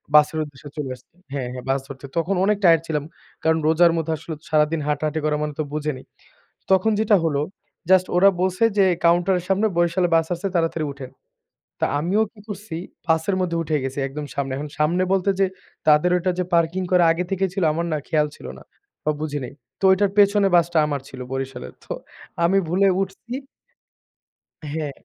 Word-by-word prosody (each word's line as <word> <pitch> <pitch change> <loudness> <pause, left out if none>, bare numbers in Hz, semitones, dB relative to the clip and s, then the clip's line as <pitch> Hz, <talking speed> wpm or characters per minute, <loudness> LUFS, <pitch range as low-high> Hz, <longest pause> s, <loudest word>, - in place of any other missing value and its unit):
বাসের 150 +1 +5
উদ্দেশ্যে 145 -1 -11
চলে 145 -3 -3
আসছি। 125 - -24 0.2
হ্যাঁ, 135 -3 -2
হ্যাঁ 125 - -7
বাস 135 +1 +2
ধরতে। 135 0 -9
তখন 180 +4 +1
অনেক 210 0 +2
টায়ারড 165 -3 +6
ছিলাম। 150 -2 -1 0.4
কারণ 160 0 +3
রোজার 170 +2 +5
মধ্যে 160 0 -1
আসলে 160 +2 -7 0.2
সারাদিন 155 +1 +2
হাঁটাহাঁটি 150 +1 -1
করা 150 -1 +1
মানে 150 -1 -3
তো - - +2
বুঝে 150 0 -1
নি। - - -10 0.7
তখন 190 +4 +4
যেটা 215 -1 +4
হলো 145 -3 +1 0.5
জাস্ট 185 -1 +5
ওরা 195 +2 +7
বলছে 185 +4 +1
যে 195 - +6 0.2
কাউন্টার 175 +3 +4
এর - - -9
সামনে 200 +3 +3
বরিশাল 175 +1 +2
বাস 165 -1 +2
আসছে 175 +3 -3
তাড়াতাড়ি 165 -2 0
উঠেন। 135 -2 -9 0.7
তা - - +3
আমিও 185 +8 +1
কি 215 - -17
করছি 205 -4 -6 0.3
বাসের 160 +4 +1
মধ্যে 175 -2 -1
উঠে 155 -1 -1
গেছি 135 +1 -4
একদম 145 +2 -6
সামনে। 135 -1 -2
এখন 150 +2 -5
সামনে 165 +4 +2
বলতে 195 +1 +2
যে 195 - +5 0.4
তাদের 150 +4 +5
ওটা 180 +1 0
যে 180 - +1
পার্কিং 170 +2 +2
করে 180 -1 +5
আগে 165 +2 0
থেকে 195 0 0
ছিল 195 -1 -2
আমার 170 +2 -2
না 155 - +1
খেয়াল 150 -1 +2
ছিল - - -11
না, - - -13 0.4
বা 155 - +2
বুঝি 150 -2 -2
নাই। 125 - -7 0.3
তো - - -4
ওটার 195 +1 +2
পেছনে 200 0 +5
বাসটা 170 -1 +2
আমার 145 -2 -2
ছিল 130 - -10
বরিশালের 135 -1 -5
তো - - -6 0.5
আমি 190 +3 +4
ভুলে 190 +4 +3
উঠছি 195 +5 -5 1.3
হ্যাঁ। 150 0 -3
165 Hz, 190 wpm, -22 LUFS, 150-185 Hz, 1.3 s, ওরা